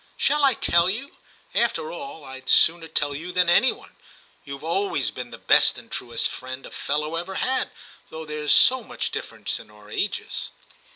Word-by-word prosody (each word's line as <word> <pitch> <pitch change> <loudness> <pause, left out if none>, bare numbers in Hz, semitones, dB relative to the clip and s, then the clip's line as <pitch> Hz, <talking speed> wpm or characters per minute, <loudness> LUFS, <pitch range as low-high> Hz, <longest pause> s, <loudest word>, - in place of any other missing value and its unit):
Shall 295 0 +2
I 270 -3 +4
tell 170 -3 +3
you? 250 +9 -4 0.4
After 475 - 0
all, 275 - -8
I'd 130 -1 -9
sooner 165 0 +7
tell 145 -2 -1
you 165 +6 -6
than 180 -1 +2
any 245 +9 +5
one; - - -14 0.5
you've 140 +1 -9
always 165 - -1
been 125 -1 -7
the - - -10
best - - +4
and - - -13
truest 120 -2 -1
friend 130 +1 -8
a - - -11
fellow 150 +3 -2
ever 180 +3 -5
had, 260 0 0 0.4
though 160 0 -8
there's 150 -1 -2
so 260 0 +6
much - - -4
difference - - -4
in - - -14
our 105 0 -17
ages.' 200 - -3
160 Hz, 180 wpm, -24 LUFS, 140-205 Hz, 0.5 s, sooner